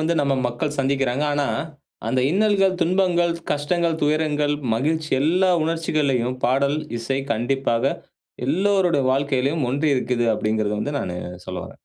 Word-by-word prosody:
வந்து 165 Hz, +2 st, +1 dB
நம்ம 140 Hz, -1 st, +1 dB
மக்கள் 145 Hz, +5 st, -3 dB
சந்திக்கிறாங்க. 135 Hz, 0 st, +1 dB
ஆனா 145 Hz, -1 st, 0 dB, 0.6 s
அந்த 130 Hz, -1 st, +1 dB
இன்னல்கள், 195 Hz, 0 st, +3 dB
துன்பங்கள், 175 Hz, 0 st, +2 dB, 0.2 s
கஷ்டங்கள், 165 Hz, +3 st, 0 dB
துயரங்கள், 150 Hz, -1 st, +1 dB, 0.2 s
மகிழ்ச்சி 155 Hz, +6 st, -1 dB
எல்லா 180 Hz, +5 st, +3 dB
உணர்ச்சிகளையும் 150 Hz, -6 st, 0 dB
பாடல், 140 Hz, +3 st, +2 dB, 0.2 s
இசை 135 Hz, +4 st, -2 dB
கண்டிப்பாக 120 Hz, +2 st, 0 dB, 0.5 s
எல்லோருடைய 180 Hz, -1 st, +2 dB
வாழ்க்கையிலும் 140 Hz, +2 st, 0 dB
ஒன்றி 145 Hz, +4 st, 0 dB
இருக்குது, 125 Hz, -2 st, 0 dB
அப்படிங்கிறத 110 Hz, -1 st, -1 dB
வந்து 145 Hz, +6 st, -3 dB
நானு 90 Hz, -1 st, -4 dB, 0.3 s
சொல்ல -, -, -5 dB
வரேன். -, -, -12 dB
145 Hz, 125 wpm, -22 LUFS, 130-165 Hz, 0.6 s, இன்னல்கள்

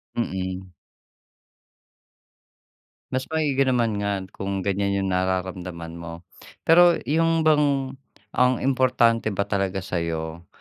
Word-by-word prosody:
Mm. 95 Hz, -4 st, -3 dB, 2.4 s
Mas 130 Hz, 0 st, -2 dB
maigi 150 Hz, -4 st, -1 dB
naman 115 Hz, -5 st, +1 dB
nga 100 Hz, -2 st, -1 dB
kung 95 Hz, -1 st, -4 dB
ganiyan 100 Hz, 0 st, 0 dB
'yung 95 Hz, -, -1 dB
nararamdaman 90 Hz, -2 st, -3 dB
mo, 85 Hz, +1 st, -8 dB, 0.4 s
pero 175 Hz, +1 st, +6 dB
'yung 165 Hz, +3 st, +2 dB
bang, 145 Hz, -4 st, +2 dB, 0.4 s
ang 125 Hz, -1 st, +2 dB
importante 125 Hz, -4 st, +2 dB
ba 100 Hz, -, +1 dB
talaga 95 Hz, -2 st, -2 dB
sa 90 Hz, -2 st, -2 dB
'yo 80 Hz, 0 st, -4 dB
100 Hz, 110 wpm, -24 LUFS, 90-130 Hz, 2.4 s, pero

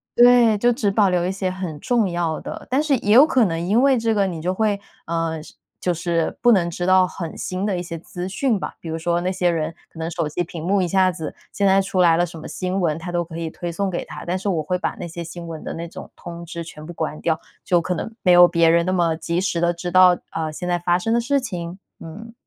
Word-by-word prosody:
对， 240 Hz, -3 st, +6 dB
就 240 Hz, +3 st, +3 dB
只 215 Hz, -5 st, 0 dB
保 200 Hz, 0 st, +3 dB
留 175 Hz, -1 st, +1 dB
一 185 Hz, -, 0 dB
些 190 Hz, -1 st, -2 dB
很 180 Hz, -5 st, -5 dB
重 230 Hz, -3 st, +1 dB
要 170 Hz, -2 st, -2 dB
的。 -, -, -8 dB
但 275 Hz, +4 st, +2 dB
是 285 Hz, -3 st, +2 dB
也 210 Hz, -2 st, +1 dB
有 260 Hz, +6 st, +9 dB
可 255 Hz, -7 st, +3 dB
能 165 Hz, -2 st, -1 dB
因 225 Hz, +5 st, +3 dB
为 275 Hz, -1 st, +4 dB
这 225 Hz, -1 st, +1 dB
个 200 Hz, -2 st, +2 dB
你 170 Hz, -3 st, -5 dB
就 180 Hz, +3 st, -1 dB
会， 210 Hz, 0 st, +1 dB, 0.3 s
呃， 165 Hz, -1 st, -2 dB
是 -, -, -14 dB, 0.3 s
就 180 Hz, -, 0 dB
是 170 Hz, -1 st, -1 dB
不 240 Hz, -, +5 dB
能 175 Hz, -5 st, +3 dB
知 175 Hz, +1 st, -4 dB
道 185 Hz, 0 st, +5 dB
很 170 Hz, -3 st, -7 dB
新 185 Hz, +2 st, -3 dB
的 195 Hz, -4 st, 0 dB
一 -, -, -2 dB
些 170 Hz, -1 st, -6 dB
资 175 Hz, +2 st, -6 dB
讯 220 Hz, +2 st, 0 dB
吧。 -, -, -5 dB
比 165 Hz, -, -7 dB
如 160 Hz, -, -2 dB
说 170 Hz, +1 st, 0 dB
那 185 Hz, +1 st, -1 dB
些 180 Hz, -1 st, +1 dB
人 165 Hz, -1 st, -1 dB
可 -, -, -19 dB
能 165 Hz, +1 st, -3 dB
手 165 Hz, -2 st, -1 dB
机 175 Hz, +4 st, -2 dB
屏 165 Hz, -1 st, -8 dB
幕 190 Hz, +3 st, +1 dB
一 180 Hz, -, 0 dB
下 190 Hz, 0 st, +4 dB
子 165 Hz, -3 st, -5 dB, 0.2 s
现 200 Hz, -, 0 dB
在 195 Hz, 0 st, +5 dB
出 190 Hz, -1 st, 0 dB
来 165 Hz, -2 st, +5 dB
了 175 Hz, -, +3 dB
什 170 Hz, -1 st, -10 dB
么 155 Hz, -, -8 dB
新 185 Hz, +1 st, -2 dB
闻， 160 Hz, -3 st, +1 dB
它 175 Hz, +1 st, -6 dB
都 175 Hz, 0 st, +1 dB
可 165 Hz, 0 st, -9 dB
以 165 Hz, -1 st, -3 dB
推 175 Hz, +1 st, -5 dB
送 195 Hz, +3 st, -1 dB
给 175 Hz, -, -3 dB
他。 -, -, -9 dB
但 180 Hz, +2 st, -1 dB
是 200 Hz, +2 st, -2 dB
我 165 Hz, -4 st, 0 dB
会 180 Hz, +4 st, -1 dB
把 -, -, -1 dB
那 -, -, -5 dB
些 170 Hz, +1 st, -6 dB
新 170 Hz, +1 st, -8 dB
闻 160 Hz, -2 st, -7 dB
的 -, -, -5 dB
那 170 Hz, +1 st, -5 dB
种 -, -, -10 dB
通 170 Hz, 0 st, -8 dB
知 170 Hz, 0 st, -6 dB
全 155 Hz, -2 st, -10 dB
部 170 Hz, -, -8 dB
关 155 Hz, -2 st, -4 dB
掉， 160 Hz, -1 st, 0 dB, 0.2 s
就 175 Hz, -2 st, +3 dB
可 180 Hz, +2 st, -2 dB
能 225 Hz, -, -5 dB
没 180 Hz, -2 st, +5 dB
有 175 Hz, 0 st, +9 dB
别 170 Hz, -1 st, +3 dB
人 170 Hz, +1 st, +4 dB
那 185 Hz, -, 0 dB
么 170 Hz, -3 st, +2 dB
及 170 Hz, +2 st, -2 dB
时 185 Hz, -3 st, -1 dB
地 170 Hz, 0 st, +3 dB
知 175 Hz, +1 st, -5 dB
道， 180 Hz, -1 st, +6 dB
呃， 160 Hz, -1 st, -3 dB
现 180 Hz, +4 st, -6 dB
在 175 Hz, 0 st, +1 dB
发 175 Hz, +1 st, +1 dB
生 225 Hz, +5 st, -1 dB
的 235 Hz, -, +2 dB
事 280 Hz, +3 st, +1 dB
情。 180 Hz, -6 st, -6 dB, 0.2 s
嗯。 220 Hz, +8 st, -9 dB
175 Hz, 300 characters per minute, -22 LUFS, 170-195 Hz, 0.3 s, 有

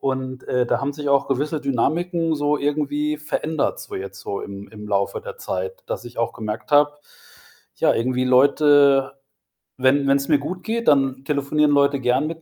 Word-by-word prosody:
und, 130 Hz, -1 st, -3 dB
äh, 125 Hz, -1 st, +1 dB
da 120 Hz, +1 st, 0 dB
haben 140 Hz, +1 st, -2 dB
sich 145 Hz, -1 st, -4 dB
auch 140 Hz, 0 st, +2 dB
gewisse 145 Hz, +3 st, -1 dB
Dynamiken, 160 Hz, +5 st, 0 dB
so 145 Hz, 0 st, +1 dB
irgendwie 150 Hz, +1 st, -1 dB
verändert, 155 Hz, 0 st, -2 dB
so -, -, -8 dB
jetzt, 95 Hz, +1 st, -7 dB
so 100 Hz, -, -4 dB
im 100 Hz, 0 st, -8 dB
im 105 Hz, -1 st, -10 dB
Laufe 100 Hz, -1 st, -1 dB
der -, -, -9 dB
Zeit, 95 Hz, 0 st, -4 dB
dass 120 Hz, -, -5 dB
ich 120 Hz, -, -12 dB
auch 115 Hz, -, 0 dB
gemerkt 110 Hz, 0 st, -6 dB
habe, 145 Hz, 0 st, +5 dB, 0.8 s
ja, -, -, +3 dB
irgendwie 125 Hz, +2 st, 0 dB
Leute 140 Hz, +1 st, +4 dB, 0.7 s
wenn 140 Hz, +2 st, +3 dB
wenn's 140 Hz, 0 st, +2 dB
mir 150 Hz, -2 st, +4 dB
gut 180 Hz, +6 st, -6 dB
geht, 230 Hz, +1 st, -3 dB
dann 135 Hz, -2 st, +2 dB
telefonieren 150 Hz, +1 st, +1 dB
Leute 140 Hz, -1 st, +3 dB
gerne 125 Hz, +3 st, +1 dB
mit 165 Hz, 0 st, -7 dB
140 Hz, 180 wpm, -22 LUFS, 125-150 Hz, 0.8 s, habe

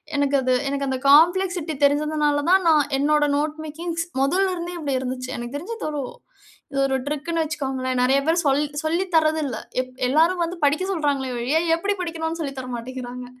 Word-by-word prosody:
எனக்கு 285 Hz, 0 st, +1 dB
அது 255 Hz, 0 st, +1 dB, 0.2 s
எனக்கு 275 Hz, 0 st, -2 dB
அந்த 265 Hz, -, -1 dB
காம்ப்ளெக்ஸிட்டி 350 Hz, +1 st, +4 dB
தெரிஞ்சதுனால 295 Hz, 0 st, +2 dB
தான். 380 Hz, +1 st, +5 dB
நான் 295 Hz, -3 st, +3 dB
என்னோட 295 Hz, +2 st, +3 dB
நோட் 300 Hz, +1 st, 0 dB
மேக்கிங்ஸ் 335 Hz, +2 st, -4 dB, 0.2 s
மொதல்ல 370 Hz, +7 st, +2 dB
இருந்தே 345 Hz, +1 st, -5 dB
இப்டி 285 Hz, -3 st, -2 dB
இருந்துச்சு. 255 Hz, 0 st, -4 dB
எனக்கு 240 Hz, +2 st, -6 dB
தெரிஞ்சு 410 Hz, +10 st, -6 dB
இது -, -, -3 dB
ஒரு 295 Hz, -2 st, -3 dB, 0.7 s
இது 275 Hz, -, -2 dB
ஒரு 265 Hz, -, 0 dB
ட்ரிக்ன்னு 325 Hz, +3 st, -2 dB
வச்சுக்கோங்களேன். 265 Hz, -4 st, -2 dB
நெறைய 265 Hz, +2 st, +4 dB
பேர் 335 Hz, +2 st, +3 dB
சொல் 280 Hz, +1 st, +3 dB, 0.2 s
சொல்லி 335 Hz, +4 st, +1 dB
தரது 315 Hz, 0 st, +3 dB
இல்ல. 240 Hz, -5 st, -3 dB, 0.2 s
எல் 255 Hz, -, -10 dB, 0.2 s
எல்லாரும் 330 Hz, +5 st, +3 dB
வந்து 350 Hz, +2 st, -5 dB
படிக்க 300 Hz, +6 st, +2 dB
சொல்றாங்களே 280 Hz, -5 st, -1 dB
ஒழிய, 265 Hz, +7 st, +1 dB, 0.2 s
எப்படி 400 Hz, +4 st, -1 dB
படிக்கணுன்னு 330 Hz, -1 st, -3 dB
சொல்லி 280 Hz, -3 st, -3 dB
தர 255 Hz, -, -6 dB
மாட்டீங்கிறாங்க. 250 Hz, +1 st, -7 dB
295 Hz, 180 wpm, -23 LUFS, 270-330 Hz, 0.7 s, தான்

